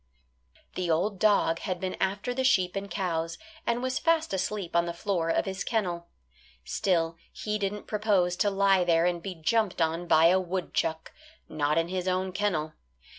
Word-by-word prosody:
The 180 -2 -2
old 185 +5 +1
dog 200 -6 +3
had 185 -3 -3
been 185 0 -3
after 200 +5 -1
the 260 +1 -1
sheep 190 -8 +3
and 200 0 -4
cows, 165 -4 -2 0.3
and 235 +1 0
was 260 0 -1
fast 330 -4 +1
asleep 190 -1 -2
on 170 0 +3
the 170 - -4
floor 175 -3 -1
of - - +1
his 190 -1 -3
kennel. 175 -7 -2 0.6
Still, 165 - 0
he 210 0 -3
didn't 205 +1 -3
propose 200 -5 +1
to 205 - +2
lie 195 -1 +3
there 170 -1 +3
and 175 -1 0
be 190 0 -6
jumped 195 +5 0
on 165 +1 0
by 160 0 +5
a 185 +1 +4
woodchuck 175 -3 -2 0.4
not 150 0 0
in 165 0 +2
his 185 0 -3
own 185 0 0
kennel. 180 -6 -1
185 Hz, 175 wpm, -28 LUFS, 170-205 Hz, 0.6 s, by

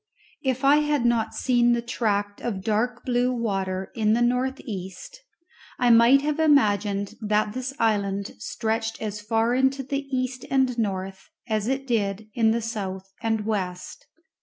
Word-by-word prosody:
If 260 0 -1
I 285 +2 +6
had 295 -4 +1
not 235 -2 +1
seen 240 -2 +3
the 235 - 0
tract 205 -4 -1
of 200 -6 -3
dark 225 +3 -1
blue 245 0 +1
water 195 -5 -2
in 215 -1 +2
the 235 - +2
north 255 +2 0
east, 215 - -8 0.6
I 245 -1 +3
might 235 +4 +6
have 300 +1 -1
imagined 205 -9 +2
that 210 0 +1
this 255 +1 -3
island 200 -4 0
stretched 225 - -2
as 210 -1 -4
far 225 +2 +1
into 265 +1 +1
the 275 +1 -3
east 255 -1 -2
and 265 -2 +2
north 190 -2 -3 0.2
as 215 -2 -1
it 270 +1 -1
did 215 -3 -1
in 225 -2 +3
the 230 +1 0
south 195 -4 -5
and 225 -2 -1
west. 205 - -4
230 Hz, 160 wpm, -25 LUFS, 205-255 Hz, 0.6 s, I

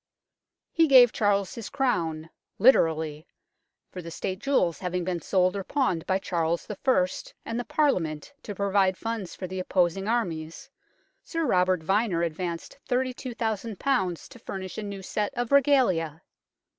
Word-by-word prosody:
He 330 -1 +4
gave 250 -4 +7
Charles 200 -2 +1
his 230 - -7
Crown 165 - -1 0.3
literally, 160 - +3 0.6
for 180 - -7
the 170 - -8
State 185 +3 -4
jewels 210 - +1
having 180 -1 -2
been 175 -1 -2
sold 185 +3 +2
or 195 - -3
pawned 185 - -1
by 190 - +2
Charles 170 -3 -1
I. - - -4 0.7
and 230 +1 -3
the - - -2
Parliament 180 - 0
to 205 - -7
provide 195 -1 +2
funds 225 -5 -4
for 185 - -6
the 185 +1 -5
opposing 185 +1 +1
armies, 200 - -2 0.5
Sir 330 -1 -2
Robert 180 - +2
Vyner 195 -1 +1
advanced 170 - -5
32,000 240 -5 -2
to 245 -5 -1
furnish 190 +1 -6
a - - -3
new 200 -2 -6
set 210 +7 -2
of 245 0 -2
regalia. 220 - +3
190 Hz, 145 wpm, -27 LUFS, 170-240 Hz, 0.7 s, gave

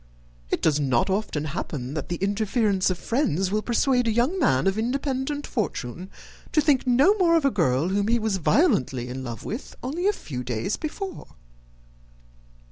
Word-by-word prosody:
It - - -1
does 150 -2 +3
not 130 +3 +1
often 190 -7 -1
happen 140 -4 -4
that 155 +1 -4
the 175 - -1
interference 200 0 +1
of 185 - -1
friends 195 - 0
will 215 +1 +1
persuade 245 +1 +1
a - - +3
young 250 - +1
man 130 - +2
of 195 +2 +1
independent 270 +4 -2
fortune 180 - -4 0.4
to - - +4
think 285 -4 +2
no 270 +11 +5
more 335 -2 +4
of 315 - 0
a 275 - +4
girl 160 - +1
whom 200 +1 0
he 235 +1 +3
was 220 -3 0
violently 150 - +2
in 130 +1 -5
love 120 -3 -7
with 230 +6 -6
only 325 +9 -1
a - - +5
few 125 - -6
days 120 - -2
before." 375 +5 -6
210 Hz, 175 wpm, -25 LUFS, -, 0.4 s, no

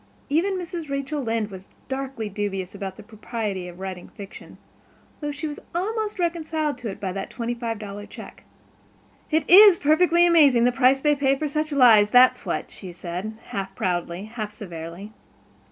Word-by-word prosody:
Even 365 +7 +1
Mrs. 340 -3 -6
Rachel 275 +1 -3
Lynde 225 -3 -2
was 190 0 -10 0.2
darkly 265 -4 -4
dubious 195 -2 -4
about 195 -1 -6
the 215 - -11
propriety 215 -3 -5
of 175 0 -11
writing 190 -2 -7
fiction, 200 -1 -11 0.6
though 295 - -4
she 295 +2 -6
was 295 - -7 0.2
almost 430 +3 -2
reconciled 315 -5 -2
to 240 -3 -5
it 195 - -7
by 195 -3 -3
that 195 +1 -5
twenty 235 0 -3
five 230 -2 -4
dollar 205 -1 -8
check. - - -12 0.9
"It 315 0 +1
is 395 0 +9
perfectly 340 +3 +4
amazing, 290 -9 +5
the 245 - +4
price 260 +1 +3
they 295 +2 +3
pay 275 -1 +2
for 300 +3 -3
such 305 +1 -2
lies, 230 -7 +6
that's 250 +3 +5
what," - - -3
she 185 -3 -10
said, 180 +5 -6
half 195 -1 -5
proudly, 175 0 -2
half 220 -1 -5
severely. 175 +1 -8
240 Hz, 170 wpm, -24 LUFS, 200-300 Hz, 0.9 s, is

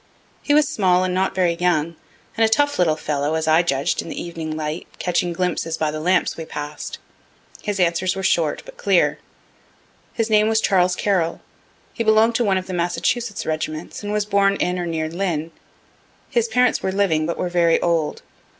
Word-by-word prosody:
He 290 - +2
was 300 -1 +4
small 185 - +2
and 185 -1 -1
not 190 +1 0
very 180 -2 +2
young, 170 -2 0 0.4
and 225 - +2
a 220 - +4
tough 285 +3 +2
little 165 -3 +3
fellow, 150 0 -2
as 160 0 -1
I 160 +2 +5
judged 140 -5 0
in - - -9
the - - -5
evening 160 -2 -5
light, 155 +1 -4
catching 175 0 0
glimpses 165 -2 -2
by 155 -1 0
the 155 - -4
lamps 180 +3 +1
we 165 - -6
pass'd. 150 -1 -6 0.6
His 205 -2 -3
answers 180 +1 +1
were 190 - -4
short, 165 -5 +1
but - - -13
clear. - - +2 1.0
His 225 -2 0
name 215 -1 +4
was 220 0 +3
Charles 180 -4 +2
Carroll; 180 -5 0 0.5
he 230 - -2
belong'd 220 +1 +4
to 245 - +1
one 195 -4 +2
of 185 - -3
the 185 - -6
Massachusetts 180 +6 -1
regiments, 155 0 -4
and 205 0 -4
was 210 0 0
born 200 -1 +2
in 180 -1 -1
or 175 - -3
near 160 -1 -2
Lynn. 165 -2 -2 0.8
His 235 -2 +2
parents 250 +2 +2
were 190 - -1
living, 175 -6 +1
but 170 - -3
were 180 - -1
very 170 -2 +3
old. 165 -3 -1
180 Hz, 195 wpm, -21 LUFS, 160-205 Hz, 1.0 s, I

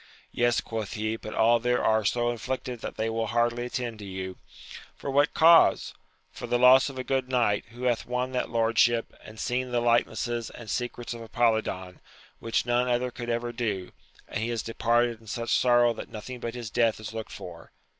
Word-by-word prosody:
Yes, 120 -1 +2
quoth 110 -3 -5
he, 110 +1 -2
but 110 -1 -8
all 115 +1 +4
there 125 +1 0
are 110 0 +3
so 120 +3 +1
afflicted 125 +1 -4
that - - -6
they 110 - -1
will 115 0 -1
hardly 120 +1 0
attend 120 -3 -4
to 105 - -8
you. 95 -1 -6 0.3
— - - -13
For 140 - -4
what 145 +2 +2
cause? 165 +1 +5 0.2
— - - -41
For - - -7
the 120 - +1
loss 130 +2 +6
of 135 - -10
a 130 - -3
good 130 -1 -1
knight, 120 -5 +1
who 120 +2 -10
hath 120 -2 0
won 125 +1 -2
that 125 -1 -2
lordship, 115 0 +2
and 110 +1 -12
seen 125 +1 -1
the 120 -1 +1
likenesses 120 0 0
and 115 -3 -9
secrets 120 -1 -3
of 115 - -8
Apolidon, 110 -6 -1 0.4
which 115 0 -1
none 120 +1 +1
other 125 0 0
could 120 0 -6
ever 120 0 -1
do, 105 -6 -3 0.4
and - - -4
he 115 - -2
is 115 -2 -2
departed 115 0 +1
in 110 - -18
such 115 +2 -3
sorrow 120 -1 +4
that - - -8
nothing 120 +4 -8
but 115 0 -5
his 120 -4 -6
death 115 -3 +2
is 110 0 -7
looked 110 -1 -6
for. 85 -2 -10
120 Hz, 205 wpm, -27 LUFS, 110-125 Hz, 0.4 s, loss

